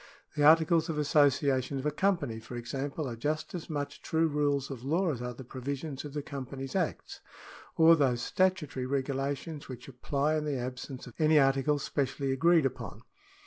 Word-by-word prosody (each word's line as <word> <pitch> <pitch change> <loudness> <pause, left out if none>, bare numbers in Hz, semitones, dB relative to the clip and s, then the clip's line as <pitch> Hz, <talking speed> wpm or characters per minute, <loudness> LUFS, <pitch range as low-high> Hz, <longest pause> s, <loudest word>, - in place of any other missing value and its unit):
The 150 - +1
articles 160 +2 +5
of 160 - -2
association 140 -2 +2
of 135 - -5
a 150 - +2
company, 150 - 0
for 115 +2 -9
example, 135 +5 -4
are 120 - -4
just 150 +7 -3
as 175 -2 -6
much 145 -2 -4
true 160 0 +1
rules 145 -2 0
of 125 -3 -7
law, 165 +6 +1
as 125 -4 -5
are 125 0 -4
the 130 - -9
provisions 135 +3 -5
of 145 -2 -8
the 145 - -2
Com 140 -3 -6
panies 135 +2 -7
Acts, 180 -4 -2 0.6
or 165 +1 +7
those 125 -6 +1
statutory 175 -9 0
regulations 140 +3 -3
which 125 -1 -8
apply 140 +4 -1
in 155 - -2
the 145 -3 -1
absence 125 +1 -6
of 125 - -11
any 155 0 +4
articles 140 +1 +3
specially 135 -1 -1
agreed 165 +3 +4
upon. 135 - -4
140 Hz, 185 wpm, -30 LUFS, 130-155 Hz, 0.6 s, or